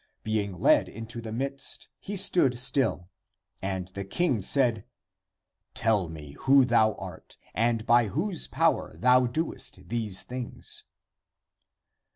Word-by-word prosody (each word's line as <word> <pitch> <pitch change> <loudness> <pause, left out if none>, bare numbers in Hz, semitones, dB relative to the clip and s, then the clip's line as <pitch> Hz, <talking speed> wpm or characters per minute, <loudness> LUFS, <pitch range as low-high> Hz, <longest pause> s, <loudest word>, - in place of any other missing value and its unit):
Being 105 -2 -1
led 90 - +3
into 115 +2 -7
the 110 -1 -7
midst, 135 +4 -2
he 205 - -6
stood 175 -10 +3
still. 115 - +1 0.5
And 95 -2 -3
the 100 +1 -6
king 120 - 0
said, 120 -1 +3 0.5
" 95 0 -57
Tell 105 -6 +1
me 75 -3 -9
who 135 0 +5
thou 110 -3 +3
art - - -10 0.2
and 115 0 0
by 120 -1 +4
whose 175 - -2
power - - 0
thou 125 +1 +4
doest 130 -2 -4
these 110 -5 -2
things?" 125 -1 -6
115 Hz, 130 wpm, -27 LUFS, 100-130 Hz, 0.5 s, who